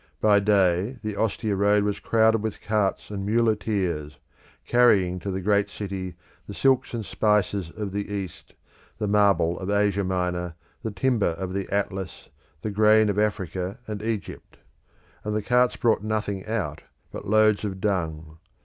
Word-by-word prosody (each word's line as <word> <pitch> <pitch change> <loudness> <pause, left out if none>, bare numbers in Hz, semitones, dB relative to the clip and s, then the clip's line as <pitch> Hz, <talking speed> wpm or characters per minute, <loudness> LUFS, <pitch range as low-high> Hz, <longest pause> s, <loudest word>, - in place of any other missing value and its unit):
By 105 -1 +5
day 100 +2 +2
the 105 -1 -3
Ostia 110 -1 -1
road 100 +1 +3
was 105 -1 -1
crowded 110 -1 +3
with 110 -1 -4
carts 105 -1 -1
and 100 -1 -4
muleteers, 100 -8 0 0.5
carrying 100 -7 +3
to 100 - -5
the 95 0 -3
great 100 +1 +2
city 95 -3 -5 0.3
the - - -7
silks 130 -2 +2
and 110 -3 -4
spices 100 -4 +1
of 105 +2 -5
the 100 +1 -4
East, 95 -4 -6 0.4
the 105 -1 -2
marble 100 -5 +3
of 95 - -5
Asia 100 -1 +2
Minor, 90 -2 -2 0.3
the 115 - -3
timber 105 -4 +1
of 95 -1 -4
the 100 0 -3
Atlas, 95 -2 -3 0.3
the 110 - -2
grain 110 +1 +5
of 100 0 0
Africa 95 -1 -2
and 105 -2 -5
Egypt; 110 -2 -5 0.7
and 105 0 -2
the 105 - -1
carts 125 +3 +3
brought 115 -5 +2
nothing 105 -3 -2
out 90 -9 -2 0.3
but - - -8
loads 110 0 +4
of 95 -2 -4
dung. 80 -5 -2
100 Hz, 160 wpm, -25 LUFS, 95-110 Hz, 0.7 s, By